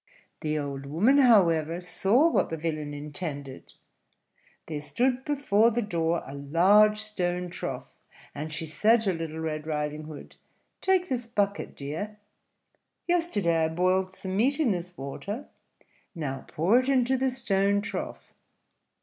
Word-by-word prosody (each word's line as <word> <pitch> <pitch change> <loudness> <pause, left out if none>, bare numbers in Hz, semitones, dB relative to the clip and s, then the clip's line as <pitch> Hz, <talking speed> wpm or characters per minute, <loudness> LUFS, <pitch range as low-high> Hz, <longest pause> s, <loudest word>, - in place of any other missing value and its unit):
The 155 0 -1
old 140 -2 -4
woman, 215 - +3
however, 170 - +4
saw 200 - +3
what - - +1
the 165 - -3
villain 155 -2 -3
intended. 145 -2 -6 0.9
There 150 -2 -5
stood 245 - 0
before 250 -7 +3
the 235 +1 -1
door 170 -4 -1
a 135 - -9
large 185 +10 +4
stone 180 -4 -2
trough, - - -6 0.4
and 150 +2 -5
she 155 +2 -3
said 215 +9 +3
to 195 -4 0
Little 165 -1 -5
Red 155 -1 -4
Riding 150 0 -3
Hood, 155 -1 -11 0.4
"Take 375 -1 +2
this 245 -6 -2
bucket, 205 -3 -1
dear: 165 +10 -5 0.9
yesterday 205 - +1
I - - +1
boiled 185 +3 +1
some 190 0 -5
meat 265 +9 +2
in 280 -8 +3
this 180 -1 -4
water, 200 - -6 0.7
now 135 -5 -4
pour 190 +10 +3
it 255 +1 -2
into 260 -1 +3
the 265 +1 +1
stone 200 -5 +1
trough." 200 - -6
180 Hz, 140 wpm, -27 LUFS, 155-225 Hz, 0.9 s, however